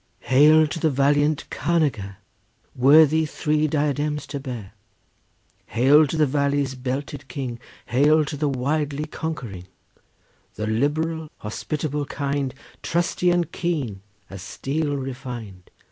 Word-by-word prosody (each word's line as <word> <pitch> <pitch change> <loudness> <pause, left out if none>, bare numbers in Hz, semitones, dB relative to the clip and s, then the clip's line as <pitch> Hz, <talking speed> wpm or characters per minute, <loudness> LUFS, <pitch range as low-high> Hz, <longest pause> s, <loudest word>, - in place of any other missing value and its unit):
Hail 150 +5 +6
to 160 +2 -4
the 160 - +2
valiant 145 +2 +2
carnager, 135 - 0 0.6
Worthy 155 +4 +5
three 155 0 0
diadems 150 0 -1
to 145 -1 -5
bear! 120 -8 -7 0.9
Hail 140 +7 +5
to 160 - -3
the 155 - +4
valley's 140 -1 0
belted 135 +2 -5
king! 125 -4 -5 0.3
Hail 150 +5 +3
to 145 - -5
the 145 0 0
widely 145 +2 -1
conquering, 125 - -6 0.9
The 105 - -3
liberal, 155 +8 -1
hospitable, 145 +6 -3
kind, 140 -2 -2 0.3
Trusty 175 +1 0
and 175 -2 +1
keen 145 - -2 0.3
as 95 -1 -9
steel 145 - -2
refined! 125 -8 -7
145 Hz, 115 wpm, -23 LUFS, 130-155 Hz, 0.9 s, Hail